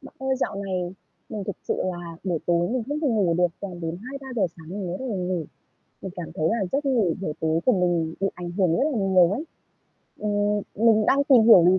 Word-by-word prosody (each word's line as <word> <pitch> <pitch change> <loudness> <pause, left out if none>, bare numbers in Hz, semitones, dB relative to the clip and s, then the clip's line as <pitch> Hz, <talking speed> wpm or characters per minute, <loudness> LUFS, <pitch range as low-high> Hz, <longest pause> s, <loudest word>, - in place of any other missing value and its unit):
Bạn 275 - -13
ơi, 265 0 0
dạo 255 - -1
này 185 -2 -3 0.3
mình 205 -3 -5
thực 200 - -4
sự - - +2
là 175 -2 -4
buổi 175 -4 0
tối 175 0 +2
mình 250 0 -1
không 295 +1 -2
thể 300 - +1
ngủ 200 -8 +2
được, 180 - +5
toàn 185 -3 -6
đến 165 0 -3
2:00-3:00 265 -4 -4
sáng 160 -2 -13
mình 195 0 -4
mới 175 +1 -3
bắt 265 - -6
đầu 215 - -2
ngủ. 180 -2 -2 0.6
Mình 190 - -5
cảm 175 -2 -6
thấy 155 +1 +1
là 220 -1 +1
giấc 285 +2 0
ngủ 230 - +2
buổi 170 -6 -2
tối 160 +1 +1
của 255 - +6
mình 175 -4 +1
bị 195 - +2
ảnh 175 -1 -6
hưởng 175 -2 +2
rất - - +1
là 240 - -1
nhiều 190 -3 +4
ấy. 275 +10 -2 0.7
Ừm, 205 0 0 0.2
mình 220 -2 +5
đang 280 +1 +4
tìm 260 -5 +6
hiểu 220 -6 +8
lý 185 +1 +5
195 Hz, 240 wpm, -25 LUFS, 175-230 Hz, 0.7 s, hiểu